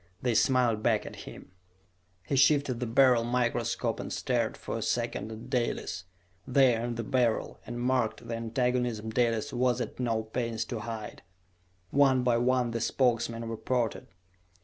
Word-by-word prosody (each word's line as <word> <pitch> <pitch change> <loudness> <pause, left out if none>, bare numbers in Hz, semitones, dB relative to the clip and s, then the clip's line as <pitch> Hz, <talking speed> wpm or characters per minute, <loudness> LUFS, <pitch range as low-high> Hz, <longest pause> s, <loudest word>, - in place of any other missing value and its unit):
They 125 -2 0
smiled 120 -2 +3
back - - +1
at - - -8
him. - - -11 0.7
He 140 - -2
shifted 140 -2 +3
the 125 - -2
Beryl 125 0 +4
microscope 120 -1 -1
and - - -5
stared - - -1
for - - -5
a - - -5
second 110 - -2
at 115 +3 -9
Dalis, 120 -7 -2 0.4
there 125 -3 +4
in 120 0 -3
the 115 - -3
Beryl, 120 -2 0
and 120 - -5
marked 120 -2 0
the 115 - -3
antagonism 115 -1 -1
Dalis 115 -2 0
was 125 0 +1
at 120 0 -5
no 115 -3 0
pains 115 0 -3
to 120 - -4
hide. 110 -1 -6 0.7
One 135 -2 +4
by 120 -1 +3
one 125 -1 +2
the 115 0 -3
Spokesmen 115 -2 0
reported. 115 +1 -2
120 Hz, 155 wpm, -29 LUFS, 115-125 Hz, 0.7 s, Beryl